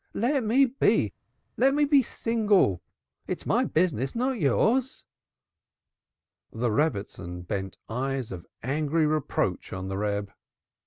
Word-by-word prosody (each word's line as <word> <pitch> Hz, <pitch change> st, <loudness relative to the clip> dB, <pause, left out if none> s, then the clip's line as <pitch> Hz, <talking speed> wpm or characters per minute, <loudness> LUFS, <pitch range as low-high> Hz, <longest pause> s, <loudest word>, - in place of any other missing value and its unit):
Let 260 Hz, +4 st, +1 dB
me 245 Hz, +6 st, +4 dB
be! 265 Hz, +2 st, +1 dB, 0.4 s
Let 270 Hz, +3 st, +4 dB
me 295 Hz, 0 st, +3 dB
be 285 Hz, -1 st, +5 dB
single! 210 Hz, -, +1 dB, 0.5 s
It's -, -, -4 dB
my -, -, +2 dB
business, 155 Hz, -7 st, 0 dB
not 255 Hz, +1 st, 0 dB
yours." 235 Hz, -, +1 dB, 1.5 s
The 115 Hz, 0 st, -1 dB
Rebbitzin 100 Hz, -, -2 dB
bent 95 Hz, +1 st, -4 dB
eyes 130 Hz, +1 st, -3 dB
of 90 Hz, -2 st, -8 dB, 0.2 s
angry 155 Hz, +4 st, +1 dB
reproach 155 Hz, -2 st, -1 dB
on 95 Hz, 0 st, -5 dB
the 95 Hz, +1 st, -3 dB
Reb. 100 Hz, -1 st, -2 dB
150 Hz, 120 wpm, -27 LUFS, -, 1.5 s, be